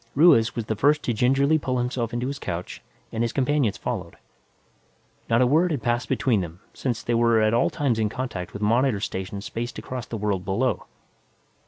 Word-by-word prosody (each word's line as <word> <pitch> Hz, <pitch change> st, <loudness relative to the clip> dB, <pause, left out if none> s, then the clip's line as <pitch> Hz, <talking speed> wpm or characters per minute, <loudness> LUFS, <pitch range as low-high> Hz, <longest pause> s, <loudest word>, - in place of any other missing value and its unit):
Ruiz 135 Hz, -7 st, +5 dB
was 115 Hz, -3 st, -3 dB
the 110 Hz, -, -2 dB
first 145 Hz, +7 st, +3 dB
to 120 Hz, -, 0 dB
gingerly 135 Hz, +7 st, +3 dB
pull 130 Hz, -3 st, -1 dB
himself 120 Hz, -1 st, -1 dB
into 120 Hz, +1 st, -2 dB
his 140 Hz, +2 st, -4 dB
couch 85 Hz, -6 st, -5 dB, 0.3 s
and 115 Hz, +1 st, -1 dB
his 115 Hz, -, 0 dB
companions 135 Hz, -5 st, +1 dB
followed. 90 Hz, -9 st, -4 dB, 1.1 s
Not 115 Hz, +2 st, +4 dB
a -, -, +4 dB
word 160 Hz, +8 st, +3 dB
had 145 Hz, -8 st, -2 dB
passed 120 Hz, +1 st, 0 dB
between 115 Hz, -7 st, +2 dB
them, 85 Hz, 0 st, -7 dB
since 120 Hz, -4 st, -3 dB
they 120 Hz, -, -1 dB
were 115 Hz, -1 st, +4 dB
at 110 Hz, 0 st, +3 dB
all 120 Hz, -, +3 dB
times 130 Hz, -6 st, 0 dB
in 110 Hz, -1 st, +1 dB
contact 110 Hz, -7 st, -5 dB
with 100 Hz, -, -6 dB
monitor 115 Hz, +1 st, +2 dB
stations 100 Hz, 0 st, -4 dB
spaced 120 Hz, +2 st, -5 dB
across 125 Hz, -2 st, -6 dB
the 115 Hz, -, -4 dB
world 100 Hz, -3 st, -1 dB
below. 115 Hz, +8 st, -1 dB
120 Hz, 195 wpm, -24 LUFS, 105-130 Hz, 1.1 s, Ruiz